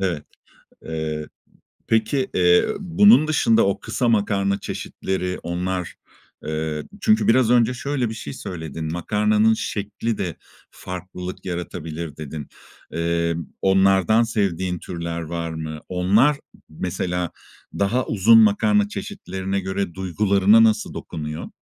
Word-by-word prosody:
Evet. 85 Hz, -6 st, -1 dB, 0.6 s
Eee, 80 Hz, -1 st, -4 dB, 0.6 s
peki, 115 Hz, +4 st, +1 dB
eee, 90 Hz, -1 st, +4 dB
bunun 190 Hz, -1 st, +5 dB
dışında 115 Hz, -8 st, +3 dB
o 100 Hz, -, 0 dB
kısa 125 Hz, -, -1 dB
makarna 100 Hz, -2 st, +1 dB
çeşitleri, 90 Hz, -1 st, -4 dB
onlar, 90 Hz, +1 st, -3 dB, 0.5 s
eee, 80 Hz, -1 st, -3 dB, 0.2 s
çünkü 215 Hz, +2 st, +3 dB
biraz 120 Hz, 0 st, +4 dB
önce 120 Hz, 0 st, +4 dB
şöyle 135 Hz, -1 st, -2 dB
bir 110 Hz, -, -5 dB
şey 70 Hz, -10 st, -7 dB
söyledin, 80 Hz, -1 st, -6 dB
"Makarnanın 105 Hz, +4 st, +2 dB
şeklide 105 Hz, -4 st, -3 dB, 0.3 s
farklılık 90 Hz, 0 st, -7 dB
yaratabilir." 85 Hz, -3 st, -5 dB
dedin. 75 Hz, -1 st, -7 dB, 0.4 s
Eee, 85 Hz, 0 st, 0 dB, 0.3 s
onlardan 95 Hz, +3 st, +4 dB
sevdiğin 95 Hz, -6 st, -1 dB
türler 85 Hz, 0 st, -5 dB
var 85 Hz, +1 st, -4 dB
mı? 80 Hz, -1 st, -6 dB
Onlar 100 Hz, +11 st, +3 dB, 0.3 s
mesela 90 Hz, +1 st, -3 dB, 0.5 s
daha 110 Hz, +6 st, +1 dB
uzun 115 Hz, +2 st, +5 dB
makarna 205 Hz, -, +4 dB
çeşitlerine 95 Hz, -, -4 dB
göre 95 Hz, -2 st, -3 dB
duygularına 100 Hz, +3 st, +4 dB
nasıl 110 Hz, -1 st, +1 dB
dokunuyor? 75 Hz, 0 st, -6 dB
95 Hz, 110 wpm, -22 LUFS, 85-110 Hz, 0.6 s, bunun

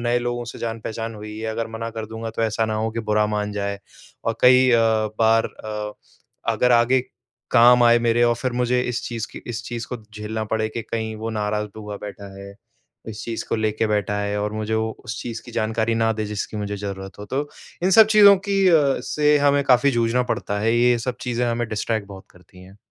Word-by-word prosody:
नए 120 Hz, 0 st, +1 dB
लोगों 120 Hz, 0 st, -3 dB
से 120 Hz, -, -9 dB
जान 115 Hz, -1 st, -4 dB
पहचान 115 Hz, +1 st, -5 dB
हुई 105 Hz, 0 st, -8 dB
है, 110 Hz, -, -4 dB
अगर 115 Hz, +1 st, -3 dB
मना 115 Hz, 0 st, -4 dB
कर 110 Hz, -1 st, -6 dB
दूँगा 110 Hz, +1 st, -6 dB
तो 115 Hz, -, -3 dB
ऐसा 110 Hz, 0 st, 0 dB
ना 110 Hz, -, -2 dB
हो 110 Hz, +1 st, -1 dB
कि 115 Hz, +1 st, -4 dB
बुरा 105 Hz, 0 st, +3 dB
मान 105 Hz, 0 st, -2 dB
जाए। 100 Hz, -1 st, -3 dB, 0.5 s
और 115 Hz, -, -1 dB
कई 130 Hz, +1 st, +6 dB
अ, 115 Hz, -, +5 dB, 0.4 s
बार 115 Hz, 0 st, +4 dB
अ, 105 Hz, -1 st, -6 dB, 0.6 s
अगर 125 Hz, 0 st, +2 dB
आगे 120 Hz, +2 st, +4 dB, 0.5 s
काम 125 Hz, 0 st, +7 dB
आए 120 Hz, 0 st, +6 dB
मेरे 120 Hz, 0 st, +2 dB
और 120 Hz, 0 st, +3 dB
फिर 130 Hz, 0 st, -2 dB
मुझे 125 Hz, +1 st, +1 dB
इस 125 Hz, -1 st, -3 dB
चीज़ 115 Hz, -2 st, -4 dB
की -, -, -9 dB
इस 120 Hz, -1 st, -4 dB
चीज़ 120 Hz, -1 st, -5 dB
को 125 Hz, -, -4 dB, 0.2 s
झेलना 110 Hz, +1 st, -4 dB
पड़े 110 Hz, 0 st, 0 dB
कि 115 Hz, +1 st, -5 dB
कहीं 110 Hz, 0 st, -4 dB
वो 110 Hz, +1 st, -4 dB
नाराज़ 105 Hz, -1 st, -2 dB
हुआ 105 Hz, -1 st, -7 dB
बैठा 100 Hz, -1 st, -8 dB
है। 100 Hz, 0 st, -10 dB, 0.5 s
इस 110 Hz, 0 st, -7 dB
चीज़ 115 Hz, -1 st, -4 dB
को -, -, 0 dB
लेके 110 Hz, 0 st, 0 dB
बैठा 105 Hz, -1 st, 0 dB
है 100 Hz, 0 st, -2 dB
और 105 Hz, +1 st, -2 dB
मुझे 110 Hz, 0 st, -2 dB
वो 110 Hz, 0 st, 0 dB
उस 110 Hz, -, -5 dB
चीज़ 115 Hz, -2 st, -5 dB
की -, -, -11 dB
जानकारी 110 Hz, +1 st, 0 dB
ना 115 Hz, 0 st, +2 dB
दे 110 Hz, 0 st, -3 dB
जिसकी 105 Hz, +1 st, -4 dB
मुझे 105 Hz, -1 st, -3 dB
ज़रूरत 95 Hz, -1 st, -7 dB
हो 105 Hz, -, -7 dB
तो 140 Hz, +5 st, -2 dB, 0.4 s
इन 190 Hz, -, +3 dB
सब 220 Hz, +2 st, +8 dB
चीज़ों 200 Hz, -1 st, +9 dB
की 195 Hz, -1 st, +2 dB
अ, 150 Hz, -6 st, +3 dB
से 150 Hz, 0 st, +2 dB
हमें 140 Hz, 0 st, +3 dB
काफ़ी 130 Hz, 0 st, +4 dB
जूझना 120 Hz, +1 st, +1 dB
पड़ता 100 Hz, 0 st, -3 dB
है। 115 Hz, +2 st, +2 dB
ये 120 Hz, 0 st, +4 dB
सब 120 Hz, +1 st, -3 dB
चीज़ें 125 Hz, 0 st, -1 dB
हमें 120 Hz, -1 st, -1 dB
डिस्ट्रैक्ट 110 Hz, -1 st, -2 dB
बहुत 95 Hz, -1 st, -11 dB
करती 90 Hz, +1 st, -18 dB
हैं। 95 Hz, +2 st, -15 dB
115 Hz, 225 wpm, -22 LUFS, 105-120 Hz, 0.6 s, चीज़ों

